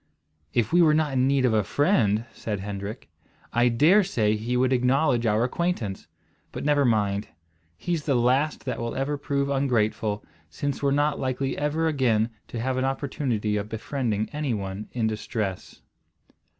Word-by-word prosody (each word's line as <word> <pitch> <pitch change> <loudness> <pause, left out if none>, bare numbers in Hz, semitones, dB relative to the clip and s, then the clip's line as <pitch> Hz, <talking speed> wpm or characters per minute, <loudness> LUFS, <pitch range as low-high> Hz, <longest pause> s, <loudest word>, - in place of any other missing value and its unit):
"If 115 - 0
we 175 - +6
were 155 -2 +5
not 155 -3 +1
in 130 0 +2
need 135 -1 +3
of 120 - +2
a 105 -1 +3
friend," 115 - +2
said 105 -3 -4
Hendrik, 100 +1 -6 0.5
"I 120 +1 +4
dare 160 - +5
say 110 - +1
he 115 +3 -2
would 130 +1 +2
acknowledge 125 -1 +2
our 110 +2 +2
acquaintance. 125 - -2 0.4
But - - -6
never 145 -1 +3
mind. 105 -3 +1 0.5
He's 165 - -2
the 140 - +2
last 130 +5 +1
that - - -3
will 115 0 -3
ever 135 +2 -1
prove 140 -1 -1
ungrateful, 110 -6 0 0.2
since 140 - -3
we're 140 - +2
not 145 +1 +1
likely 130 +1 -1
ever 150 +3 0
again 120 -7 +1 0.2
to 120 - -6
have 130 +2 -1
an 130 - 0
opportunity 130 -6 -1
of 105 +1 -4
befriending 110 -2 -2
any 150 -5 -1
one 100 +1 -5
in 120 -3 -1
distress." 105 -3 -4
125 Hz, 165 wpm, -25 LUFS, 110-140 Hz, 0.5 s, we